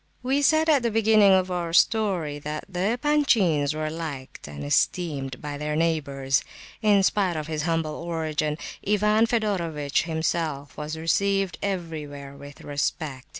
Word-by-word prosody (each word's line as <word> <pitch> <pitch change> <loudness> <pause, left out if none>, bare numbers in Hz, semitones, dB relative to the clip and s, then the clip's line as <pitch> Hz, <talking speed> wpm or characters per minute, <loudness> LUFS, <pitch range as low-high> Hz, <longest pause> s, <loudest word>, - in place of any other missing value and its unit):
We 270 +3 +1
said 315 +2 +4
at 295 -4 +4
the 235 - +1
beginning 215 -2 +5
of 185 -1 +3
our 170 -2 -2
story, 180 -8 +2
that 150 +1 -5
the 190 +4 -1
Epanchins 220 - +2
were 155 0 -2
liked 150 - -7
and 70 0 -8
esteemed 135 - 0
by 145 -1 -6
their 150 0 -2
neighbours. 140 -5 0 0.4
In 205 -3 +4
spite 190 -3 +1
of 155 - -3
his 155 -1 -3
humble 165 -2 0
origin, 155 -3 -2 0.3
Ivan 210 +2 +3
Fedorovitch 170 - 0
himself 160 -4 -2
was 150 +1 -5
received 195 +2 0
everywhere 155 -7 -5
with 140 0 -12
respect. 145 -1 -3
165 Hz, 145 wpm, -25 LUFS, 150-200 Hz, 0.4 s, beginning